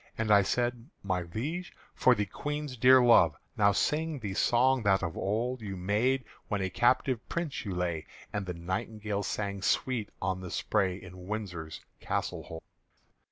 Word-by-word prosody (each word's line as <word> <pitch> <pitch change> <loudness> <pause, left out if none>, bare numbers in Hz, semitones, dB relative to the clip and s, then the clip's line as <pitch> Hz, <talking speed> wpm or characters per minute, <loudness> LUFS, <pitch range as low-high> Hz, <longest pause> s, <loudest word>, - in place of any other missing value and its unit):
And 110 -1 0
I 100 -1 +8
said, 120 +4 -1
"My 95 -2 0
Liege, 140 - -4 0.2
for 125 - +4
the 105 -2 0
Queen's 150 +4 -4
dear 130 +2 +7
love 85 -10 +6 0.2
Now 100 -1 +4
sing 155 +9 0
the 105 -6 -4
song 125 +5 +3
that 100 -2 +3
of 85 - -2
old 115 +5 -1
You 100 -3 -5
made, 110 +8 +1 0.2
when 105 - -1
a 95 -1 -2
captive 125 +3 +2
Prince 170 -8 -3
you 95 -3 -3
lay, 85 -3 -2 0.3
And 100 -2 -2
the 90 - -3
nightingale 100 +4 -3
sang 100 -1 -3
sweet 115 +1 0
on 95 0 -2
the 90 - -6
spray, 95 0 0
In 90 -1 -11
Windsor's 90 -7 -5 0.2
castle - - -2
hold." 80 0 -9
105 Hz, 165 wpm, -30 LUFS, 95-125 Hz, 0.3 s, I